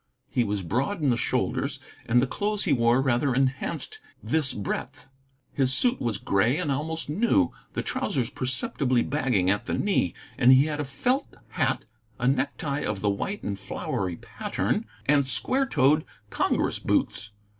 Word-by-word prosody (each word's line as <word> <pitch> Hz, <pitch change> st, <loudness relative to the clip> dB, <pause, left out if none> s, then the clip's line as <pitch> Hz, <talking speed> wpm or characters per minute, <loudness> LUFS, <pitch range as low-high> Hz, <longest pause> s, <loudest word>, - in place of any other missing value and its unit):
He 125 Hz, -, +2 dB
was 105 Hz, -3 st, -2 dB
broad 130 Hz, -, -1 dB
in 140 Hz, -, +4 dB
the -, -, +3 dB
shoulders, 115 Hz, -, -1 dB, 0.3 s
and 120 Hz, +1 st, +4 dB
the 125 Hz, -, +3 dB
clothes 205 Hz, +9 st, -1 dB
he 160 Hz, -, +2 dB
wore 120 Hz, +1 st, +3 dB
rather 130 Hz, 0 st, +2 dB
enhanced 135 Hz, -, -1 dB, 0.2 s
this 155 Hz, -4 st, +1 dB
breadth. 105 Hz, +5 st, -4 dB, 0.5 s
His 135 Hz, -1 st, +2 dB
suit 245 Hz, -, +1 dB
was 115 Hz, -4 st, -1 dB
gray 100 Hz, +8 st, +2 dB
and 165 Hz, -5 st, -1 dB
almost 160 Hz, +4 st, -2 dB
new, 235 Hz, -, +2 dB, 0.2 s
the -, -, -2 dB
trousers 140 Hz, -, -1 dB
perceptibly 130 Hz, 0 st, 0 dB
bagging 125 Hz, -10 st, +1 dB
at 105 Hz, +4 st, -1 dB
the -, -, 0 dB
knee, 195 Hz, -, +1 dB, 0.2 s
and 125 Hz, -, +7 dB
he 130 Hz, +2 st, +7 dB
had 150 Hz, -1 st, -3 dB
a 150 Hz, -, -1 dB
felt 250 Hz, -, -1 dB
hat, -, -, 0 dB, 0.3 s
a 125 Hz, -, 0 dB
necktie 140 Hz, +2 st, 0 dB
of 100 Hz, -2 st, -2 dB
the 105 Hz, -, +2 dB
white 195 Hz, -, -3 dB
and 100 Hz, -1 st, -3 dB
flowery 95 Hz, -2 st, -3 dB
pattern, -, -, -2 dB, 0.2 s
and 140 Hz, -2 st, +3 dB
square 260 Hz, -, 0 dB
toed 150 Hz, -, +3 dB, 0.3 s
"Congress" -, -, +1 dB
boots. 105 Hz, -, 0 dB
135 Hz, 165 wpm, -26 LUFS, 120-155 Hz, 0.5 s, and